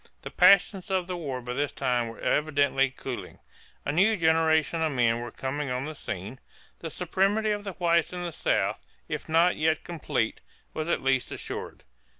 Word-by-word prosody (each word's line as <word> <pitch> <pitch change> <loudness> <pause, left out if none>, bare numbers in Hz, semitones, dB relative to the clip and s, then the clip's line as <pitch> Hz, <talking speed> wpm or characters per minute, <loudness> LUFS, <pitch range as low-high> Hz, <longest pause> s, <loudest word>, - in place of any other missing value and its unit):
The - - -7
passions 195 -1 +5
of 190 -2 +1
the 180 0 -4
war 140 -7 -4
by 125 0 -4
this 145 +2 -1
time 120 -2 0
were 115 - -9
evidently 140 -3 +2
cooling. 130 -1 -7 0.5
A - - 0
new 195 +8 +3
generation 160 -1 +2
of 160 -2 +1
men 120 -2 +2
was 120 -1 -7
coming 140 +2 -3
on 125 +1 -2
the 155 - -5
scene. 105 -2 -6 0.4
The 165 - -5
supremacy 195 +6 +1
of 205 0 -3
the 195 - -4
whites 170 -1 +2
in 180 0 -5
the 175 - -3
South, - - 0 0.3
if - - -5
not 165 +3 +4
yet 160 +1 +1
complete, 150 -9 -2 0.3
was 155 +1 -3
at - - 0
least 135 -1 +1
assured. - - -6
155 Hz, 180 wpm, -27 LUFS, 130-175 Hz, 0.5 s, passions